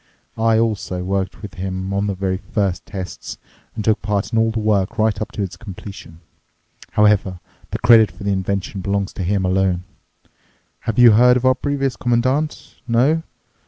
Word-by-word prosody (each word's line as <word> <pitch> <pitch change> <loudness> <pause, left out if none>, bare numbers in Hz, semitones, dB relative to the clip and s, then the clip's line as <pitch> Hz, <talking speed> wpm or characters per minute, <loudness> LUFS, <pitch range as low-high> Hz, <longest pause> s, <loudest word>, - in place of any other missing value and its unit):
I 115 0 +3
also 105 -5 -1
worked 95 +1 -3
with 100 - -7
him 95 +1 -4
on 100 +1 0
the 100 - -2
very 95 0 -1
first 100 -1 -2
tests 95 -2 -7 0.4
and 110 - -4
took 110 -1 +2
part 105 0 -2
in 115 - +3
all 115 0 +3
the 110 - -3
work 105 0 0
right 110 -2 +1
up 110 - -4
to 105 - -2
its 95 - -5
completion. 95 -5 -10 0.7
However, 105 -3 +3 0.3
the - - -3
credit 110 -2 +6
for - - -12
the 100 - 0
invention 95 +1 -2
belongs 100 0 -1
to 95 - -4
him 95 +1 0
alone. 90 -1 +1 1.1
Have 110 - -2
you 120 -2 +8
heard 125 +3 +6
of 125 - -2
our 130 - +6
previous 135 -1 -2
Commandant? 130 +5 -1
No? 130 +8 +3
105 Hz, 175 wpm, -20 LUFS, 95-115 Hz, 1.1 s, you